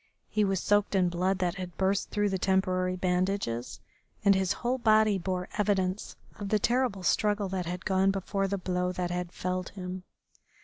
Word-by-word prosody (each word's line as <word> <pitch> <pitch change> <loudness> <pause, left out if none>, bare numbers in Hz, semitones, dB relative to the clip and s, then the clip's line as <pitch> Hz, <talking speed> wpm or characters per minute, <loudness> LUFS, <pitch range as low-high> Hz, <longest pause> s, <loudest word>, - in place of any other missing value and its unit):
He 215 - +1
was 195 -2 +1
soaked 205 +1 +2
in 180 -2 +3
blood 180 +2 0
that 180 0 -1
had 180 -2 -7
burst 195 +1 +1
through 205 0 +1
the 190 -1 -1
temporary 185 -1 +1
bandages, 180 -9 -1 0.5
and 200 - +7
his 190 0 +1
whole 250 +2 -1
body 215 -3 +4
bore 180 0 -2
evidence 195 -1 0 0.2
of 200 -1 -4
the 215 - +3
terrible 235 -3 0
struggle 205 +1 +1
that 185 -2 -3
had 180 +1 -5
gone 190 0 +3
before 195 0 -1
the 200 +1 -1
blow 180 -1 -1
that 180 -1 -2
had 175 0 -3
felled 185 0 -3
him. 185 -1 -6
190 Hz, 180 wpm, -29 LUFS, 180-200 Hz, 0.5 s, and